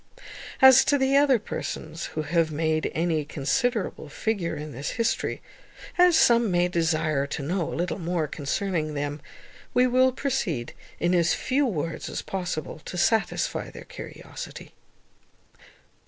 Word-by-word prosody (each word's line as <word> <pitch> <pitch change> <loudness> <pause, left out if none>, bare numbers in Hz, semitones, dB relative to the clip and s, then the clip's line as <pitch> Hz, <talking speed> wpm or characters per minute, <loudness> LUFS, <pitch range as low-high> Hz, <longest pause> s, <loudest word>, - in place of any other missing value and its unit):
As 265 0 +9
to 285 +1 +3
the 265 0 +2
other 280 -2 +5
persons 160 -6 -5
who 155 - 0
have 160 +1 +1
made 155 +1 0
any 160 -2 +1
considerable 195 - -1
figure 180 0 -2
in 150 0 -6
this 140 +3 -4
history, 230 -1 -1 0.5
as 355 -2 +6
some 235 -5 +5
may 175 -1 +2
desire 155 -4 0
to 145 0 -4
know 170 +3 -1
a - - -4
little 175 +3 -2
more 170 -2 -1
concerning 155 +2 -2
them, 145 0 -3 0.5
we 250 0 +5
will 255 +1 +4
proceed, 240 - -2 0.3
in 175 +1 +1
as 170 -1 +3
few 270 +2 +1
words 165 -6 -3
as - - -4
possible, 175 -5 -4
to 180 - -6
satisfy 220 +5 +1
their - - -10
curiosity. - - -9
175 Hz, 140 wpm, -26 LUFS, 155-240 Hz, 0.5 s, As